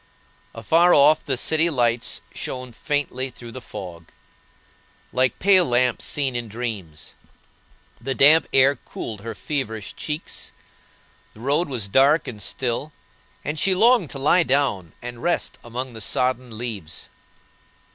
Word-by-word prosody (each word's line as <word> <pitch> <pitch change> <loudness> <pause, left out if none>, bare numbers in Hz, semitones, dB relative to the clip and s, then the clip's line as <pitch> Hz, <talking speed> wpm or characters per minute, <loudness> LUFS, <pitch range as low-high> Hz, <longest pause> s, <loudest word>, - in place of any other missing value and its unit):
Afar 165 +10 +4
off 150 +2 +5
the 135 -3 -1
city 160 +5 +2
lights 120 -5 0
shone 125 -1 -5
faintly 135 0 -2
through 120 -2 -10
the 130 - -8
fog, 85 -7 -9 1.1
like 130 -2 +2
pale 190 -1 +5
lamps 125 -1 +1
seen 135 -4 -1
in 120 -1 -3
dreams; 100 -9 -6 0.9
the 135 +2 -2
damp 155 +4 +6
air 135 +1 +5
cooled 110 -3 -7
her 115 +1 -6
feverish 110 -8 -4
cheeks; 150 +2 -5 0.8
the - - -15
road 145 +6 +1
was 120 -7 -2
dark 135 +9 +4
and 105 -4 -7
still, 130 +6 -2 0.5
and 150 +1 -2
she 190 +3 +3
longed 225 - +4
to - - -7
lie 150 +6 +4
down 130 - 0
and 120 -1 -7
rest 175 0 -1
among 125 +2 -5
the 110 - -8
sodden 125 0 -1
leaves. 105 -10 -6
130 Hz, 135 wpm, -23 LUFS, 115-145 Hz, 1.1 s, damp